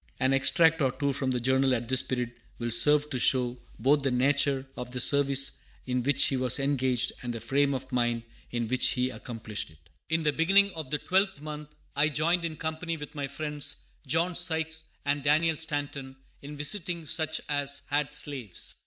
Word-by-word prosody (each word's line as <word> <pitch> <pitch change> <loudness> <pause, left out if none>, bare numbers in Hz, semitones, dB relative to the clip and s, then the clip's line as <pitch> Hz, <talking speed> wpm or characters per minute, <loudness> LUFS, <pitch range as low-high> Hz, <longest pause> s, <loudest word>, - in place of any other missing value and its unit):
] - - -30
An 130 +1 +3
extract 160 +4 +5
or 135 -2 +3
two 140 +2 -1
from 135 -1 -1
the 125 -1 0
Journal 130 +1 +2
at 115 -1 -3
this 130 +1 +3
period 125 -2 -2 0.3
will 120 0 -3
serve 150 +5 +4
to 130 - -1
show 125 -1 +2 0.2
both 145 +2 +3
the 135 - +1
nature 135 +1 +2
of 125 - -6
the 125 0 -4
service 135 +1 +3 0.3
in 125 -1 0
which 135 +2 +3
he 135 - +1
was 125 -1 +1
engaged 130 -3 +1
and 120 - -3
the 115 - -5
frame 140 +5 +1
of 130 +1 -6
mind 120 -2 0 0.3
in 120 -1 -2
which 130 +2 +2
he 125 +1 0
accomplished 115 -6 -6
it: 80 - -19 0.3
"In 160 0 +1
the 150 -1 +2
beginning 195 +5 +4
of 155 -5 -6
the 150 - 0
12th 190 -1 +1
month 150 0 -7 0.3
I 145 +2 +3
joined 165 +4 +1
in 160 -2 -3
company 160 +1 -3
with 150 -1 -8
my 145 -2 -3
friends, 150 0 -3 0.3
John 165 +6 +1
Sykes 160 -2 -1 0.2
and 145 0 +1
Daniel 155 +3 +3
Stanton, 145 -3 -3 0.3
in 145 +1 -8
visiting 170 +2 -3
such 160 +1 0
as 145 -1 0
had 145 -1 +1
slaves. 130 -10 -2
140 Hz, 195 wpm, -28 LUFS, 130-155 Hz, 0.3 s, extract